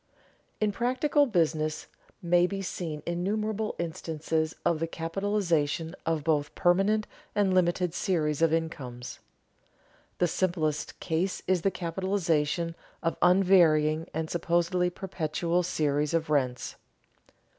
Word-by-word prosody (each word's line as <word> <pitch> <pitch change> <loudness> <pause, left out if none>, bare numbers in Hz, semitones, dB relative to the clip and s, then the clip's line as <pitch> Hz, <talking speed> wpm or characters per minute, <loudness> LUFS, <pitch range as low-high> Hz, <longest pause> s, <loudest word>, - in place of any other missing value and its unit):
_In 210 -1 +1
practical 260 +6 +2
business 155 -6 0 0.4
may 175 +1 +4
be 195 +1 -4
seen 160 -5 -4
innumerable 210 +5 -1
instances 160 -1 -2
of 170 -2 +2
the 165 - -1
capitalization 165 -2 -1
of 160 -2 0
both 150 -1 0
permanent 195 +5 +3 0.3
and 200 -2 +2
limited 180 -1 +2
series 160 -5 0
of 165 -1 +4
incomes._ 130 -7 -3 1.0
The 175 - +3
simplest 165 -4 -1
case 180 +3 -1
is 185 -2 +2
the 195 - +2
capitalization 170 -3 -1 0.3
of 165 - +1
an 180 - +6
unvarying 160 -4 +4
and 160 0 -2
supposedly 175 +2 +1
perpetual 170 -1 -1
series 150 -2 0
of 160 -2 -1
rents. 130 -4 0
170 Hz, 115 wpm, -28 LUFS, 155-185 Hz, 1.0 s, an